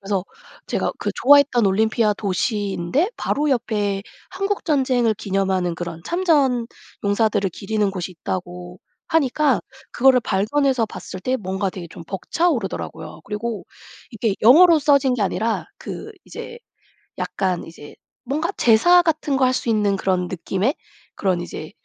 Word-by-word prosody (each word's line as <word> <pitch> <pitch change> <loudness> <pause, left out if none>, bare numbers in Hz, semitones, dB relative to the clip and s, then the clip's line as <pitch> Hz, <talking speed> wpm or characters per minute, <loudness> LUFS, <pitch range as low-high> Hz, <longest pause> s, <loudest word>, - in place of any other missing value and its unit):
그래서 195 -2 -2 0.4
제가 - - -1
그 - - -2
좋아했던 280 -4 +5
올림피아 215 +2 +2
도시인데 200 - -1
바로 300 +1 -1
옆에 205 -6 -1 0.3
한국전쟁을 280 - 0
기념하는 190 -3 -1
그런 165 -1 -6
참전 290 -9 +2 0.4
용사들을 205 -1 +1
기리는 205 +2 -1
곳이 185 -1 -5
있다고 180 0 -6 0.3
하니까 300 -2 +2 0.3
그거를 260 0 +5
발견해서 235 +4 +1
봤을 185 -3 -8
때 255 +7 0
뭔가 190 -2 -2
되게 180 -2 -8
좀 165 - -11
벅차오르더라고요. 195 - -2
그리고 215 +2 -4 0.5
이게 225 -3 -1
영어로 325 +9 +7
써진 280 -3 +3
게 230 - -1
아니라 220 +3 -1
그 430 - -7
이제 470 - -9 0.6
약간 185 -3 -2
이제 155 -3 -12 0.3
뭔가 300 +7 -2
제사 295 +11 +5
같은 310 -4 0
거 265 - +3
할 255 - +2
수 250 - -2
있는 210 -3 +2
그런 185 -2 0
느낌의 190 - -1 0.4
그런 185 -3 0
이제 155 -1 -7
220 Hz, 315 characters per minute, -21 LUFS, 190-270 Hz, 0.6 s, 영어로